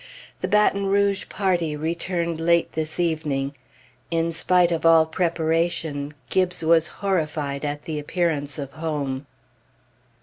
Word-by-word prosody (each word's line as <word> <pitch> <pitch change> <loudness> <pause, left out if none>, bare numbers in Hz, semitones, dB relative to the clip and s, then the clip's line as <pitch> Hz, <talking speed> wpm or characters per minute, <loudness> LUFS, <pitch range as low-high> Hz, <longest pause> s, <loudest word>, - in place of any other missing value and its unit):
The - - -2
Baton 200 -1 +3
Rouge 200 0 +1
party 175 -6 0
returned 170 +1 -2
late 170 0 +3
this 160 +1 -2
evening. 150 -5 -1 0.6
In 165 0 0
spite 175 +1 +3
of 165 - -1
all 165 -1 +6
preparation, 160 -3 -1 0.2
Gibbes 180 -2 +1
was 165 0 +4 0.2
horrified 155 -6 -1
at 145 0 -3
the 155 -2 -4
appearance 150 -2 -1
of 140 -2 -5
home. 145 -4 -3
165 Hz, 125 wpm, -23 LUFS, 150-175 Hz, 0.6 s, all